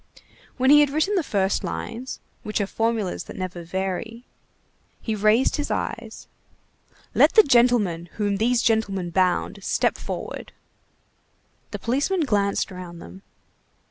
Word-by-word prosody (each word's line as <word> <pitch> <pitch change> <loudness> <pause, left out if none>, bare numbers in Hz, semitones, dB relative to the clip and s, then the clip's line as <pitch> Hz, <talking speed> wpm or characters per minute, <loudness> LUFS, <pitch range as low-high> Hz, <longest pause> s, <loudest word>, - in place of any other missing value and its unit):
When 260 +1 +4
he 295 - +9
had 295 -1 +4
written 315 +8 0
the 380 - +2
first 195 -9 0
lines, 255 +3 -5 0.2
which 215 - -3
are 200 - +1
formulas 225 -2 -1
that - - -10
never 185 -2 -5
vary, 190 +6 -4 0.8
he 225 - -3
raised 215 +4 +3
his 295 0 -3
eyes:— 230 -1 -4 0.9
"Let - - +5
the 435 - +8
gentleman 235 - +3
whom 205 -2 -1
these 235 +3 +2
gentlemen 195 -6 0
bound 185 +2 +1
step - - 0
forward." - - -6 1.2
The - - -5
policemen 285 +10 0
glanced 200 -10 0
round 180 -2 -9
them. 90 - -12
215 Hz, 135 wpm, -24 LUFS, 190-245 Hz, 1.2 s, he